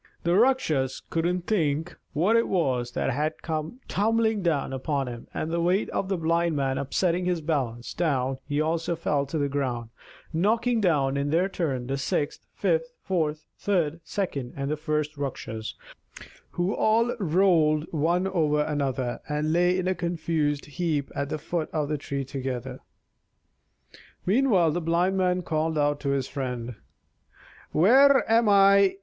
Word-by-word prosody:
The 170 - +2
Rakshas 175 - +2
couldn't 175 +2 0
think 160 -4 0 0.2
what 185 +9 +2
it 230 - +3
was 130 -9 0
that - - 0
had 150 +4 -2
come 160 - -4
tumbling 220 0 +1
down 155 -6 0
upon 135 +1 -1
him; 120 -1 -7
and 160 - -3
the 170 0 0
weight 180 +4 +1
of 190 - -2
the 195 - 0
Blind 170 0 +1
Man 135 -1 0
upsetting 175 +6 0
his 180 -2 0
balance, 135 -7 -2
down 135 -6 0
he 145 0 -1
also 165 +2 0
fell 145 -4 -1
to 155 - -3
the 145 -1 +1
ground, 125 -5 -3 0.4
knocking 225 +7 +2
down 140 -7 +2
in 140 +1 -1
their 170 +5 +2
turn 145 -10 -2
the 135 +2 -2
sixth, 145 +2 -2
fifth, - - 0
fourth, 155 -4 -1
third, 170 -5 0
second, 145 -12 -3
and 140 +2 -2
first 150 -1 -2
Rakshas, 110 -6 -5 0.7
who 175 +4 -1
all 230 +3 +2
rolled 160 -4 +3
one 170 +4 +1
over 155 -6 +1
another, 135 -5 -2
and 150 +1 0
lay 180 +1 +3
in 185 0 -1
a 185 - +2
confused 165 -4 -1
heap 150 -2 -2
at 140 0 -3
the 155 - -2
foot 160 +1 -3
of 150 -2 -1
the 150 -1 -1
tree 140 -1 -4
together. 130 -1 -5 1.5
Meanwhile 195 - +3
the 175 +3 -2
Blind 170 +3 +1
Man 180 -1 +1
called 160 0 -1
out 145 0 +1
to 140 - -2
his 140 -2 0
friend: 125 -3 -4 1.0
"Where 265 - +5
am 225 0 +4
I? 200 -1 +6
160 Hz, 155 wpm, -26 LUFS, 140-180 Hz, 1.5 s, I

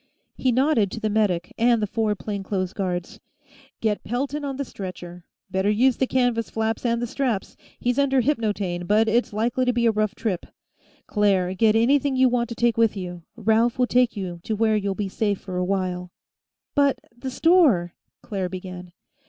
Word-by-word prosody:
He 260 - +1
nodded 255 -4 +2
to - - -4
the 215 -1 -1
medic 195 -5 0
and 235 0 +4
the 210 - 0
four 215 0 0
plain 200 0 -5
clothes 190 -1 -2
guards. 185 +2 -3 0.6
"Get 215 -2 0
Pelton 275 +5 -2
on 275 -1 -3
the 280 +1 -3
stretcher. 180 -4 -8 0.3
Better 190 +2 +1
use 245 +4 +3
the 260 - +1
canvas 245 -3 +1
flaps 225 0 -2
and 235 -1 +1
the 240 - -1
straps. 240 -4 -2 0.2
He's 245 +3 0
under 270 -2 +3
hypnotaine, 205 -9 -1
but 215 +2 +3
it's 235 +3 +1
likely 235 +4 0
to 250 0 +2
be 235 0 +1
a 230 - +5
rough 215 0 -1
trip. 205 -6 -3 0.6
Claire, 195 -3 +1
get 215 +2 +3
anything 275 +4 +3
you 260 0 +4
want 240 -1 0
to 235 - -5
take 235 0 +1
with 225 -2 +3
you. 180 -2 -6
Ralph 225 +1 +2
will 250 - +3
take 245 -2 +2
you 180 -3 -5 0.2
where 220 0 +3
you'll 200 -2 -1
be 205 0 -2
safe 205 0 -1
for 185 -2 -6
a 180 - +1
while." 180 -1 -2 0.6
"But 280 -2 +3 0.2
the 260 +2 -5
store 260 - +3 0.2
" - - -63
Claire 190 -3 -3
began. 180 -1 -8
220 Hz, 190 wpm, -24 LUFS, 190-245 Hz, 0.6 s, a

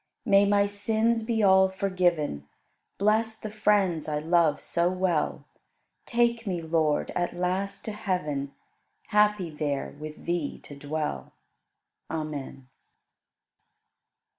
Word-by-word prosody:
May 200 0 +5
my 200 0 +4
sins 220 +3 +1
be 225 -1 0
all 190 -1 +6
forgiven; 175 - 0 0.5
Bless 220 +2 +2
the 215 - -7
friends 205 -6 +1
I 150 -1 -1
love 165 0 +2
so 170 +1 0
well; 185 -4 -1 0.6
Take 235 -1 +1
me, 180 -3 -1
Lord, 160 -2 0
at 175 0 -2
last 190 +3 -2
to 220 - -3
heaven. 180 -10 -2 0.6
Happy 210 -5 +2
there 145 -3 -3
with 155 0 -9
Thee 170 -4 -2
to 145 - -10
dwell. 145 - -4 0.8
Amen. 150 -4 -5
180 Hz, 115 wpm, -27 LUFS, 155-205 Hz, 0.8 s, all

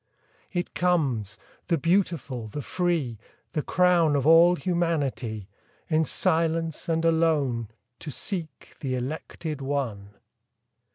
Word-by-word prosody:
It 175 -2 -3
comes, 135 - 0 0.3
the 170 - +2
beautiful, 160 - 0
the 140 +7 -6
free, 165 - -1 0.3
The 155 - 0
crown 175 -3 +3
of 140 -2 +1
all 165 +3 +7
humanity, 145 - -1 0.4
In 160 -1 +3
silence 165 -1 0
and 165 0 +1
alone 155 -8 +2 0.3
To - - -7
seek 160 0 -6
the 130 -3 -2
elected 150 +3 -4
one. 115 -8 -3
155 Hz, 110 wpm, -26 LUFS, 130-170 Hz, 0.4 s, all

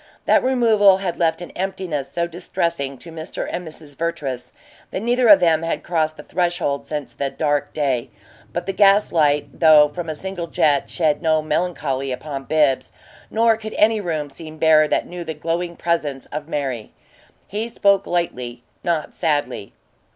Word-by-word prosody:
That - - +4
removal 225 -7 +5
had 190 -3 -3
left 165 0 +1
an - - -9
emptiness 185 -7 -3
so 170 0 0
distressing 170 -5 -3
to 165 - -11
Mr. 160 +1 -5
and 175 -1 -5
Mrs. 155 -2 -9
Vertrees 150 -7 -3 0.4
that - - -3
neither 245 +1 +2
of 205 -3 +9
them 165 -2 +3
had 165 0 -2
crossed 160 -2 0
the 150 - -9
threshold 175 -5 -1
since 145 -6 -4
the 140 +2 -2
dark 145 -1 -1
day; 135 -6 -1 0.4
but - - -3
the 195 - -2
gas 200 +1 +4
light, 150 -3 +1
though 155 -2 +7
from 165 +2 -6
a 155 - -3
single 185 0 -5
jet, 150 -3 +2
shed 155 -3 +1
no 155 -2 +2
melancholy 150 -4 -1
upon 135 +1 -5
Bibbs, 150 -4 +2 0.4
nor 225 0 +3
could 215 -1 -7
any 215 0 +3
room 155 -6 -3
seem 155 +1 -9
bare 155 -1 +5
that - - 0
knew 175 0 -7
the 160 -1 -5
glowing 170 +3 -2
presence 150 -6 -1
of 150 0 -5
Mary. 135 -8 -3 0.5
He 215 +3 -3
spoke 200 -4 +2
lightly, 125 -9 -2 0.2
not 170 -3 -1
sadly. 145 - -1
160 Hz, 170 wpm, -21 LUFS, 145-180 Hz, 0.5 s, of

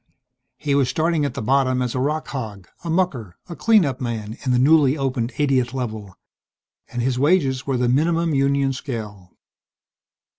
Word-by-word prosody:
He 145 -2 -1
was 140 -3 +2
starting 160 -2 +1
at 140 - -3
the - - -4
bottom 130 +1 +2
as 125 -2 -1
a 130 - -2
rock 150 +4 -1
hog, 105 -9 -6 0.2
a 170 - -5
mucker, 145 - -1
a 170 - -7
clean 220 -3 +4
up 135 -1 -3
man 110 -3 -4
in 130 - 0
the 125 - +3
newly 145 +1 +4
opened 130 -3 -1
80th 135 -3 0
Level. 110 -7 -5 0.7
And 120 - -3
his 125 0 0
wages 140 -4 +2
were 135 -2 0
the 125 0 +1
minimum 165 +5 +1
union 140 0 +2
scale. 105 -9 -7
130 Hz, 175 wpm, -22 LUFS, 120-150 Hz, 0.7 s, clean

